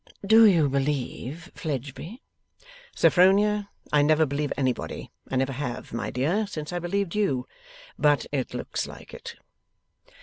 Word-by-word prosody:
'Do 220 +2 +8
you 165 -7 +4
believe 140 +3 -3
Fledgeby?' 150 - -6 0.7
'Sophronia, 200 +3 +4 0.2
I 150 - +5
never 155 +2 +4
believe 145 0 -2
anybody. 130 -2 -2 0.2
I - - -2
never 135 +1 +1
have, 125 -4 -5
my 110 -3 -3
dear, 170 - 0
since 155 -4 -6
I 175 - -1
believed 175 +1 -2
you. 145 -12 0 0.5
But 145 -1 +3
it 135 -3 -2
looks - - -3
like - - -12
it. - - -8
150 Hz, 135 wpm, -26 LUFS, 135-190 Hz, 0.7 s, Do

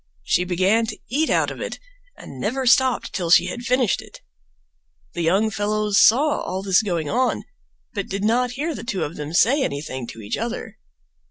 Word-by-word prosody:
She 180 - +1
began 190 +6 +2
to - - -5
eat 310 +5 +1
out - - +2
of - - -8
it - - -4 0.4
and 135 - -11
never 260 - -2
stopped 255 0 +3
till 175 -3 -2
she 175 - +6
had 240 - -5
finished 250 -3 +1
it. - - -14 0.9
The 175 - -3
young 195 +7 +2
fellows 210 0 +1
saw 285 +6 +4
all 190 +1 -4
this 190 -1 +3
going 170 -7 -2
on, 250 - 0 0.5
but 200 -3 -4
did 195 +1 -3
not 245 +3 +1
hear 305 +5 -2
the - - -7
two 220 -6 -2
of 150 - -5
them 150 0 -6
say 245 - +3
anything 140 - -3
to 115 - -9
each 105 - -3
other. 235 +2 -5
210 Hz, 190 wpm, -22 LUFS, 175-245 Hz, 0.9 s, she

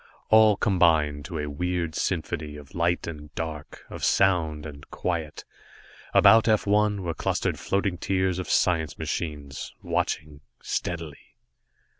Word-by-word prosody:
All 110 -2 +6
combined 80 -7 +2
to 85 -2 -5
a 75 - -2
weird 85 +2 -2
symphony 80 -4 -2
of 75 +2 -12
light 85 -1 0
and 75 -3 -8
dark, 80 -2 -6
of - - -9
sound 80 -6 +2
and 70 -2 -10
quiet. 80 -4 -3 0.7
About 110 +3 +6
F 110 -2 +3
1 105 -1 +2
were 85 -2 -2
clustered - - -1
floating 95 -3 -1
tiers 95 -1 0
of 90 - -5
science 80 -5 +1
machines, 75 -3 -5
watching 75 -1 -2 0.2
steadily. 80 -4 -5
85 Hz, 130 wpm, -26 LUFS, 75-95 Hz, 0.7 s, All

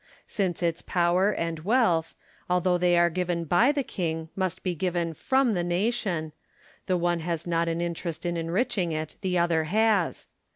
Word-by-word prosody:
Since 185 -4 -2
its 170 -1 0
power 180 +2 +2
and 165 -4 -3
wealth, 180 -4 +1 0.3
although 180 0 +2
they 175 0 +3
are 170 0 +4
given 175 -1 -2
hy 205 - +4
the 290 -2 -1
king, 165 -6 -3
must 185 -1 -2
be 185 - 0
given 170 -1 -1
from 260 - +1
the 175 -3 0
nation, 175 -3 -1 0.3
— - - -29
the 185 -2 +2
one 175 0 0
has 165 0 -3
not 170 -1 0
an 165 0 -1
interest 170 -1 -4
in 175 0 -1
enriching 180 +3 -1
it, 155 0 -4
the 185 -2 0
other 170 -2 +2
has. 210 0 +1
175 Hz, 175 wpm, -27 LUFS, 165-190 Hz, 0.3 s, are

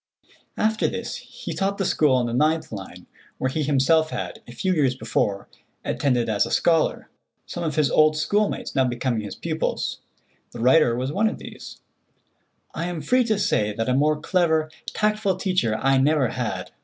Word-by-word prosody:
After 220 0 +1
this 235 0 -4
he 250 0 -8
taught 200 0 -1
the 195 - -1
school 150 -6 +3
on 125 -1 +1
the 120 - -3
9th 155 +5 +1
line, 95 -4 -8 0.3
where 130 - -1
he 155 - -1
himself 150 +3 +3
had, 90 - -5
a - - -10
few 185 +10 -1
years 140 -6 +2
before, 100 -6 -1 0.4
attended 125 -4 0
as 105 -2 +2
a - - -3
scholar, 165 -2 +1 0.3
some - - -5
of 155 -3 -2
his 150 -3 +2
old 155 0 +4
schoolmates 205 +7 0
now 135 - +3
becoming 120 -2 -1
his 105 - -7
pupils. 160 -1 -2 0.5
The 120 - -8
writer 125 0 +4
was 130 +3 -2
one 215 +6 +2
of - - -6
these; - - -11 0.9
and - - -3
I - - -2
am 175 -3 -4
free 250 - +3
to 220 -2 +1
say 105 - +1
that 115 +2 -2
a - - +2
more 150 +3 +2
clever, 160 -2 +1 0.2
tactful 210 -2 0
teacher 180 - 0
I 135 0 +3
never 140 -2 +3
had. - - -4
155 Hz, 185 wpm, -24 LUFS, 125-180 Hz, 0.9 s, old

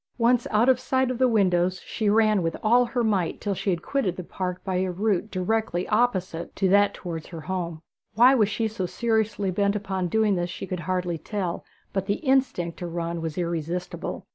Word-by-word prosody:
Once 240 0 +3
out 220 +3 +3
of 260 -2 +5
sight 260 -1 +1
of 250 - -4
the 260 - +5
windows 185 -5 +2
she 215 -3 -1
ran 215 -1 +4
with 165 -1 -2
all 240 +3 +5
her 245 0 -1
might 195 -6 0
till 205 - -1
she 195 +2 -2
had 175 -3 -1
quitted 255 -11 -1
the 180 - -5
park 180 +1 -4
by 190 -2 -1
a 185 0 0
route 200 +2 0
directly 185 -1 -1
opposite 190 -7 0
to 195 - +1
that 200 +1 +4
towards 165 -3 -6
her 165 -3 -8
home. 170 -2 -4 0.3
Why 245 +4 +7
she 210 +3 -2
was 220 0 -2
so 185 -4 -1
seriously 220 -3 0
bent 200 +2 +1
upon 190 -3 -2
doing 215 +2 +2
this 175 -1 -1
she 175 - -6
could 185 -1 -4
hardly 180 -2 -1
tell 185 0 -3 0.3
but 195 -1 -2
the 200 - +2
instinct 260 - 0
to 175 - -4
run 170 0 -3
was 160 -2 -4
irresistible. 175 +2 -3
190 Hz, 205 wpm, -25 LUFS, 175-220 Hz, 0.3 s, Why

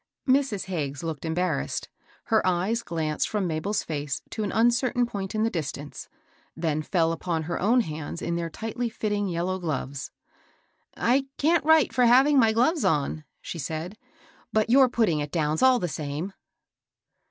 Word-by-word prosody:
Mrs. 260 -6 +2
Hagges 145 -6 -3
looked 160 -2 -4
embarrassed. 175 +3 -1 0.4
Her 220 -2 +2
eyes 185 +6 +1
glanced 160 -5 -2
from 210 -3 -1
Mabel's 170 +5 -1
face 145 -3 -4
to 220 - -3
an 200 - -2
uncertain 240 +3 +2
point 200 -3 -5
in 215 - +1
the 225 - +1
distance, 145 -3 -5 0.5
then 160 -2 0
fell 165 0 +1
upon 165 -1 -2
her 170 +2 -3
own 235 +6 +4
hands 155 -3 -5
in 170 - -2
their 170 -1 -2
tightly 225 +7 -3
fitting 210 -2 -1
yellow 180 +1 -2
gloves. 140 -5 -4 0.5
" - - -43
I 265 +3 +2
can't 330 +3 +3
write 310 -5 +4
for 250 +1 +4
having 270 +4 +6
my 225 -3 +5
gloves 255 +8 +2
on," 150 +1 0 0.2
she 170 - -6
said, 160 +6 -4 0.3
" - - -29
but 220 +1 +1
your 260 0 +6
putting 215 -10 +1
it 145 0 -4
down's 155 -2 0
all 260 -1 +6
the 180 - -1
same." 155 +4 -4
185 Hz, 170 wpm, -26 LUFS, 160-235 Hz, 0.5 s, having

